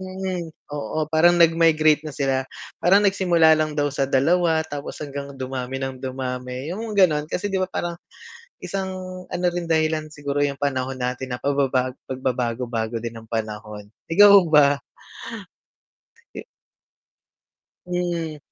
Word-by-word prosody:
mm, 185 -2 -4 0.2
oo, 150 +2 -2
parang 170 +2 +5
nagmigrate 160 -2 +4
na - - -8
sila, 135 -2 0 0.4
parang 195 +4 +5
nagsimula 175 -5 +4
lang 155 -1 0
daw 145 -1 +1
sa 140 - 0
2, 160 +4 +3
tapos 145 -2 -7
hanggang 140 -1 -7
dumami 130 0 -4
ng 130 -1 -4
dumami 130 0 -5
yung 220 +2 -5
gano'n. 155 -6 +3
Kasi, 190 +4 -2
'di - - +1
ba, 185 - +1
parang, 175 -2 -2 0.7
isang 190 -1 -3 0.4
ano 180 - -2
rin 175 -1 -3
dahilan 155 -1 +1
siguro 145 -1 -4
yung 140 - -1
panahon 130 -2 -1
natin 125 0 -3
na 125 - -5
pababago 135 -2 0
pagbabago-bago 120 -3 -2
din 115 0 -6
ng 115 - -11
panahon, 105 -2 -5 0.2
ikaw 200 +4 +8
ba? 145 -2 +5 1.6
Eh - - -7 1.4
Mhm. 170 -3 -2
145 Hz, 135 wpm, -23 LUFS, 130-170 Hz, 1.6 s, ikaw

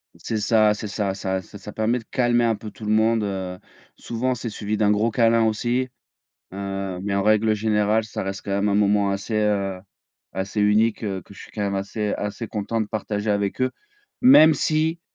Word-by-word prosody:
C'est 110 - -4
ça, 105 0 +4
c'est 105 +1 -6
ça, 100 -1 -2
ça 95 -1 -2
ça 100 - -12
ça 105 +2 -9
permet 110 +4 0
de - - -13
calmer 120 -1 +2
un 115 -2 +2
peu 105 0 -9
tout - - -13
le 105 - 0
monde, 110 0 +3
heu. 95 -2 -4 0.4
Souvent, 125 +2 -2
c'est 120 -1 -5
suivi 105 0 -3
d'un 105 -1 +2
gros 105 +3 +2
câlin, 115 0 +3
aussi, 120 +4 0 0.7
heu, 95 -1 -4
mais 100 0 -2
en 100 - +1
règle 110 +1 +3
générale, 105 0 +1
ça 110 - -5
reste 95 0 -4
quand 100 - -3
même 100 +1 +1
un 100 - +1
moment 100 -1 +3
assez, 100 +3 -4
heu, 100 -3 0 0.5
assez 95 +3 -2
unique 105 +2 +3
que 95 -3 -3
je 100 - -13
suis - - -13
quand 105 - -5
même 100 -1 -1
assez 100 +2 -2
assez 105 +2 -4
content 110 +2 -3
de 110 - -1
partager 105 -1 -3
avec 100 +1 0
eux, 130 - +1 0.5
même 245 - +8
si, 155 +3 0
105 Hz, 205 wpm, -23 LUFS, 100-115 Hz, 0.7 s, même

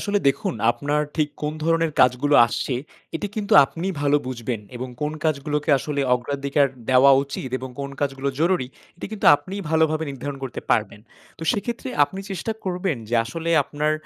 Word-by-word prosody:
আসলে 205 -1 0
দেখুন 135 - -1 0.2
আপনার 145 +5 -1
ঠিক 155 -2 +2
কোন 150 - -1
ধরনের 165 -1 +2
কাজগুলো 125 +4 +3
আসছে 125 +2 -2 0.4
এটি 205 - -3
কিন্তু 205 -1 -2
আপনি 165 +7 -6
ভালো 145 0 +3
বুঝবেন 120 -3 -4 0.2
এবং 130 +1 -5
কোন 150 +1 -1
কাজগুলোকে 150 0 0
আসলে 145 +1 -3
অগ্রাধিকার 140 +3 0 0.2
দেওয়া 130 +2 +7
উচিত 140 -1 -6
এবং 130 0 -6
কোন 140 - -4
কাজগুলো 140 -1 -1
জরুরি 170 -6 +2 0.3
এটি - - -6
কিন্তু 215 - -2
আপনি 190 +6 -9 0.2
ভালোভাবে 160 0 +2
নির্ধারণ 135 +1 -6
করতে 130 - -5
পারবেন। 105 - +1 0.4
তো - - -8
সেক্ষেত্রে 235 +5 -4 0.2
আপনি 190 +6 -8
চেষ্টা 195 +4 -3
করবেন 180 -3 -1
যে 120 - -1
আসলে 165 +7 -4
আপনার 150 +2 -1
145 Hz, 165 wpm, -23 LUFS, 135-165 Hz, 0.4 s, দেওয়া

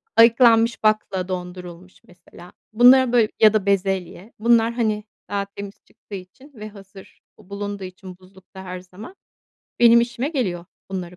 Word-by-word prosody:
ayıklanmış 230 0 +4
bakla 215 -4 0
dondurulmuş 180 -1 -9
mesela. 180 0 -17 0.2
Bunları 250 +2 +6
böyle 230 -3 +3
ya 215 -1 +6
da 215 -3 0
bezelye. 195 0 -2
Bunlar, 230 0 +2
hani, 215 -3 -1 0.3
daha 200 0 -2
temiz 200 0 -10
çıktığı 205 - -13
için 195 +10 -13
ve 215 -1 -9
hazır 195 -1 -16 0.2
bulunduğu 200 0 -7
için 185 0 -11
buzlukta 190 0 -16
her 185 -1 -7
zaman 185 - -13 0.7
benim 235 0 +6
işime 240 +3 -3
geliyor 195 - -3 0.3
bunları 180 -2 -6
200 Hz, 140 wpm, -21 LUFS, 185-230 Hz, 0.7 s, Bunları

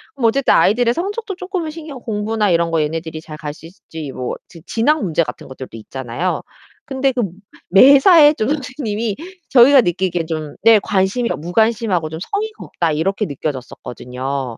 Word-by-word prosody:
뭐 250 -4 +2
어쨌든 270 +4 +2
아이들의 235 +3 +3
성적도 400 - -4
쪼끔은 370 -3 -4
신경 305 -4 -9
공부나 215 -2 -1
이런 170 0 +1
거 165 - +1
얘네들이 160 +1 -3
잘 155 -1 -10
갈 150 -2 -6
수 155 - -15
있을지 160 -4 -9
뭐 125 - -4
지 165 - -14
진학 235 +8 +1
문제 170 -3 +1
같은 - - -8
것들도 130 -2 -9
있잖아요. 130 +9 -4 0.4
근데 270 -2 0
그 245 -2 -1 0.5
매사에 280 - +7
좀 215 - -1
선생님이 250 -7 -3 0.3
저희가 265 +2 +7
느끼기엔 175 -3 -1
좀 155 -2 -5
네 225 -1 +6
관심이 200 +6 0
어 - - -1
'무관심하고 195 0 0
좀 160 +1 -7
성의가 430 - -4
없다.' 170 -2 -1
이렇게 195 +7 -1
느껴졌었거든요. 130 - -5
205 Hz, 380 characters per minute, -18 LUFS, 160-265 Hz, 0.5 s, 매사에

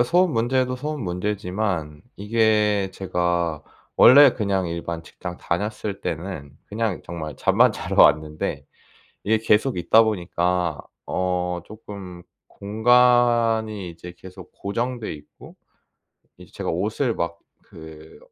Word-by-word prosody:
어 - - +7
소음 175 +7 +2
문제도 125 +2 0
소음 150 +1 -4
문제지만 90 -4 -3
이게 105 -2 +1
제가 85 -4 -1 0.3
원래 140 +1 +8
그냥 100 -5 -1
일반 85 0 -5
직장 90 +2 -8
다녔을 100 +3 -3
때는 80 -4 -6
그냥 110 -2 -3
정말 80 -3 -7
잠만 - - +4
자러 - - +2
왔는데 75 +1 +1 0.6
이게 110 +2 +2
계속 110 +1 +1
있다 100 +6 +5
보니까 90 -5 -1 0.3
어 90 -1 -1
조금 100 -4 -10 0.3
공간이 115 -2 +2
이제 85 +1 -11
계속 95 0 -13
고정돼 120 +3 -4
있고 75 -1 -15 0.8
이제 - - -16
제가 - - -4
옷을 110 - -1
막 85 0 -3 0.4
그 80 -1 -12
100 Hz, 235 characters per minute, -23 LUFS, 85-110 Hz, 0.8 s, 원래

